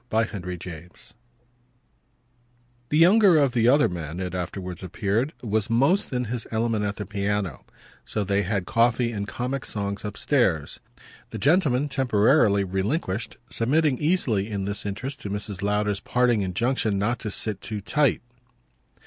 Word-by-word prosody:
Book 110 0 +1
Sixth, 100 -5 -6 0.2
Chapter 85 -1 -8
4 105 - -14 1.7
The 150 - +1
younger 185 +1 +6
of 140 -4 +3
the 115 -2 +3
other 145 +4 +5
men, 85 -1 -5
it 90 -1 -4
afterwards 90 0 -5
appeared, 105 - -1
was 110 -2 0
most 140 +13 +3
in 125 -1 -1
his 120 +1 -4
element 110 -1 0
at 100 0 -2
the 105 - -5
piano; 100 -6 -2 0.4
so 105 - -3
that - - -8
they 100 - +3
had 100 -1 -1
coffee 120 +2 +2
and 100 -3 -4
comic 125 +6 -3
songs 100 -1 -4
upstairs 105 - 0 0.5
the - - -6
gentlemen, 145 -4 +2
temporarily 120 -5 +3
relinquished, 95 - -2
submitting 140 +3 +2
easily 125 - +1
in 100 -2 -3
this 100 +1 -4
interest 130 +8 -5
to 100 - -5
Mrs. 100 -1 -4
Lowder's 105 0 0
parting 120 +1 +1
injunction 105 +3 0
not 105 +4 0
to 105 - -4
sit 105 -1 -3
too 105 -1 -4
tight. 140 +7 +1
110 Hz, 155 wpm, -25 LUFS, 100-125 Hz, 1.7 s, younger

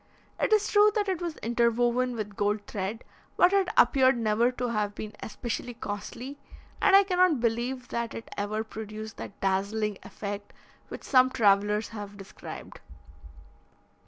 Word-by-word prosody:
It - - +1
is 425 -1 +4
true 415 0 +5
that 415 -2 +1
it 370 -3 -1
was 340 -3 -4
interwoven 240 +1 +1
with 210 -3 -5
gold 205 +1 0
thread, 205 +3 -4 0.3
but 360 +2 +5
it 390 -2 +3
appeared 260 +1 +5
never 230 +2 +2
to 250 -1 -2
have 210 -2 -1
been 215 -1 -6
especially 240 +1 -5
costly, 240 +7 -6 0.4
and 390 - +6
I 395 - +8
cannot 365 -6 +3
believe 240 +2 -1
that 235 -1 -3
it 230 - -7
ever 215 +2 -2
produced 220 0 -8
that 205 - -9
dazzling 200 +2 0
effect 205 0 -7 0.3
which - - -8
some 255 -1 +5
travellers 210 -2 +2
have 205 -2 -8
described. 195 -1 -10
230 Hz, 150 wpm, -28 LUFS, 210-260 Hz, 0.4 s, I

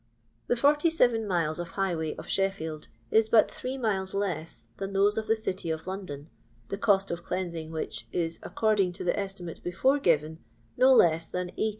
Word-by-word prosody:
The - - +2
47 280 -4 +3
miles 170 -4 0
of 175 -1 -4
highway 170 -5 -1
of 160 - -9
Sheffield 160 -6 -1 0.2
is 220 0 +4
but 220 -1 +5
three 260 +1 -5
miles 195 -6 -1
less 180 -5 -3
than 195 0 -5
those 200 +2 +4
of 220 -1 -2
the 225 - +3
city 190 -5 -3
of 160 0 -3
London, 185 -7 -6 0.4
the 195 - -3
cost 195 -2 +3
of 170 0 -4
cleansing 170 -3 -4
which 160 -1 -3
is, 165 -1 -1
according 210 -5 +1
to - - -6
the 175 - +1
estimate 195 -4 -4
before 260 +11 +2
given, 160 - +1 0.4
no 260 +1 +5
less 165 -9 +4
than 180 0 -3
18,000 220 - -1
190 Hz, 180 wpm, -28 LUFS, 165-215 Hz, 0.4 s, but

